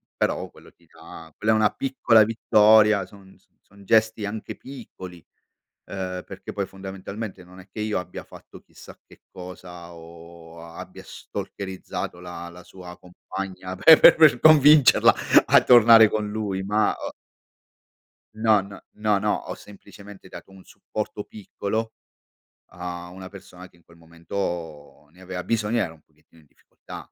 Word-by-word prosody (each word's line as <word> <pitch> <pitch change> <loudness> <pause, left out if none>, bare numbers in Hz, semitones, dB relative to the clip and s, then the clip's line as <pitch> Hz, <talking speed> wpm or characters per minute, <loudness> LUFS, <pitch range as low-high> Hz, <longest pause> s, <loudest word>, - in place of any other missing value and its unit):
però - - -2
quello - - -18
ti 85 - -30
dà 80 0 -14
quella 110 +1 0
è - - +2
una 110 -1 +2
piccola 120 -5 +2
vittoria, 105 -2 +3
son 95 -1 -18
son - - -39
son 100 0 -20
gesti 110 +1 +1
anche 105 +1 -7
piccoli, 105 -9 -11 0.7
ehm, 90 -2 -6
perché - - -10
poi 100 -1 -3
fondamentalmente 95 +1 -9
non 90 +1 -16
è 95 - -15
che 105 - -7
io 105 -3 -2
abbia 90 - -9
fatto - - -16
chissà - - -16
che - - -20
cosa 90 -1 -11
o 85 0 -14
a 85 0 -13
abbia - - -11
stalkerizzato 95 -2 -7
la 85 -1 -9
la 90 +1 -14
sua 90 -1 -13
compagna 95 +1 -8
pe 155 - +7
per 155 -6 +6
convincerla 150 -2 +6 0.3
a - - +5
tornare 115 -3 +7
con 105 -1 -3
lui, 105 -3 -4
ma 105 +2 0
ho - - -7 1.2
No, 110 -1 +3
n 100 +1 -12 0.2
no, 105 -1 0
no, 105 +1 0
ho - - -5
semplicemente 100 -1 -15
dato 95 - -13
un 95 -1 -16
supporto 105 -1 -7
piccolo 110 +2 -5 0.8
a 90 0 -8
una 95 +1 -11
persona 90 -1 -14
che 85 - -27
in 85 - -28
quel 85 +1 -21
momento 85 -3 -7
ne 90 +3 -20
aveva 90 -1 -7
bisogno, 115 +1 -1
era 80 - -2
un 80 - -22
pochettino 80 +2 -27
in 75 - -26
difficoltà. - - -14
95 Hz, 155 wpm, -23 LUFS, 90-105 Hz, 1.2 s, pe